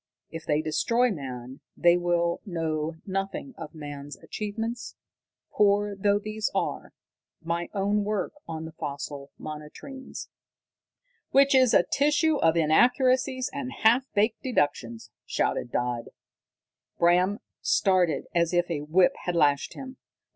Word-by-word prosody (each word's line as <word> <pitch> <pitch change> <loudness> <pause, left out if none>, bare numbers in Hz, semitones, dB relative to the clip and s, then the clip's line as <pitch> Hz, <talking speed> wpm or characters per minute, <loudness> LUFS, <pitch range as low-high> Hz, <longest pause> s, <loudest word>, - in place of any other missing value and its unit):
If 165 0 -8
they 150 0 +1
destroy 235 +10 +2
man, 130 -5 -7 0.2
they 175 0 +5
will 175 -1 0
know 160 -4 -2
nothing 195 +7 -3
of 155 - -9
man's 145 -1 -8
achievements, 225 +3 -5 0.6
poor 205 0 +2
though 200 +1 +2
these 215 +1 -3
are. - - -2 0.5
My 170 +1 -2
own 205 +1 +1
work 205 -2 -2
on 160 -1 -5
the 160 - -8
fossil 140 -2 -6
monotremes 155 - -8 0.5
" - - -47
"Which 275 0 +6
is 260 -3 +5
a - - +6
tissue 295 +2 +2
of 165 -5 +3
inaccuracies 255 - +3
and 275 -2 -4
half 235 +1 +4
baked 215 +2 +2
deductions!" 120 - -1 0.2
shouted 120 - -1
Dodd. 120 -1 -1 0.9
Bram 180 +4 +3 0.2
started 185 -5 +2
as 170 0 +2
if 175 0 +1
a 150 -3 -1
whip 170 +5 +3
had 180 - -1
lashed 145 -4 +2
him. 260 -1 -8
180 Hz, 130 wpm, -27 LUFS, 155-225 Hz, 0.9 s, Which